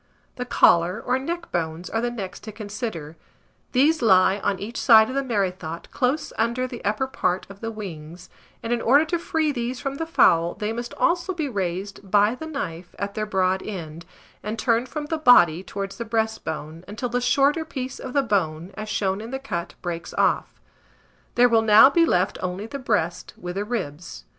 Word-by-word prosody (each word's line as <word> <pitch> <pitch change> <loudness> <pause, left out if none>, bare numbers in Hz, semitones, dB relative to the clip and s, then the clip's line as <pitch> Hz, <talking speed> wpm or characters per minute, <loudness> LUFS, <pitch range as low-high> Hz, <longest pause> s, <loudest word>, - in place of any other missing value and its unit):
The 250 - -3
collar 175 -5 +4
or 255 +1 0
neck 340 +5 -5
bones 165 0 -3
are 225 - -1
the 240 - 0
next 200 -6 -6
to 215 - -6
consider: 205 - -6 0.5
these 290 +4 +3
lie 190 -2 +5
on 195 0 0
each 220 +5 -5
side 220 -1 +7
of - - -4
the 275 - +2
merrythought, 185 -8 -3
close 265 +4 -1
under 235 +3 +1
the 250 -2 -8
upper 210 +6 0
part 185 -8 -1
of 195 - -13
the 225 - -3
wings; 175 -5 -8 0.4
and, 230 +1 -1
in 235 - -1
order 280 +6 +5
to 335 +2 -1
free 320 -3 0
these 245 -1 -3
from 275 0 -4
the 325 - -3
fowl, 170 - +3
they 210 +1 -3
must 240 +1 -6
also 350 +1 +1
be 315 -4 -2
raised 195 -2 -4
by 205 +2 +4
the 315 +5 -7
knife 180 - -6
at 200 +1 -4
their 215 0 -3
broad 190 -1 +1
end, 170 -4 -7 0.3
and 215 +2 -4
turned 235 +1 +1
from 300 +3 -4
the 315 +1 -3
body 175 - +6
towards 195 +1 -6
the - - -1
breastbone, 175 -8 -3
until 220 +5 -4
the 245 +1 -1
shorter 280 +5 +3
piece 260 -5 -6
of 255 - -7
the 280 - +3
bone, 180 -6 -1
as 215 0 -7
shown 195 -1 -1
in 225 - -7
the 265 - -3
cut, 175 -11 -5
breaks 170 -1 -5
off. - - +1 0.8
There 245 +1 +6
will 230 -2 +4
now 220 +5 +7
be 335 +2 +4
left 180 - +1
only 185 +3 -3
the 280 +5 -6
breast, 180 -9 -1
with 175 0 -6
the 200 +2 -3
ribs. 180 - -5
215 Hz, 195 wpm, -24 LUFS, 185-255 Hz, 0.8 s, side